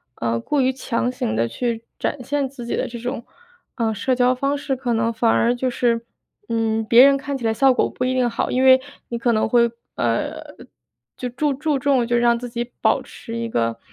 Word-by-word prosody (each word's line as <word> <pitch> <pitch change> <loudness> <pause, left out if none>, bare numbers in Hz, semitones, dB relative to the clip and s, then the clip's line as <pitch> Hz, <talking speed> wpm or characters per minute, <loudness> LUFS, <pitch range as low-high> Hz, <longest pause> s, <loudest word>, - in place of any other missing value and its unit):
呃， 115 0 -1
过 290 - -1
于 260 0 +2
强 245 -1 -2
行 110 - -2
地 115 +1 +1
去 230 - -3 0.2
展 285 - -2
现 280 0 -1
自 260 -3 -9
己 235 - -2
的 - - -1
这 235 -1 -7
种， 240 -1 -4 0.5
呃， 225 -2 0
社 255 +5 0
交 250 0 +3
方 275 +3 -1
式， 280 -1 -2
可 250 -2 -2
能 230 +1 0
反 225 0 +2
而 240 +1 +2
就 255 +1 -1
是， 240 -1 +1 0.5
嗯， 225 -1 0
别 235 +4 +7
人 280 - +5
看 275 0 -4
起 240 - -6
来 225 - +2
效 265 +3 +4
果 - - +1
不 - - -4
一 255 0 +1
定 250 -2 +2
好。 230 - -2
因 255 +1 +1
为 260 0 +7 0.3
你 235 - -3
可 235 0 +1
能 220 - +1
会， 235 0 +3 0.2
呃， 115 -1 -1 0.7
就 250 - -4
注 285 +4 0
注 290 0 -1
重 260 -3 +2
就 240 0 +1
让 235 0 +3
自 245 0 -6
己 240 +1 -5
保 - - +3
持 230 -1 -8
一 230 - -2
个 115 - -1
240 Hz, 240 characters per minute, -21 LUFS, 230-260 Hz, 0.7 s, 别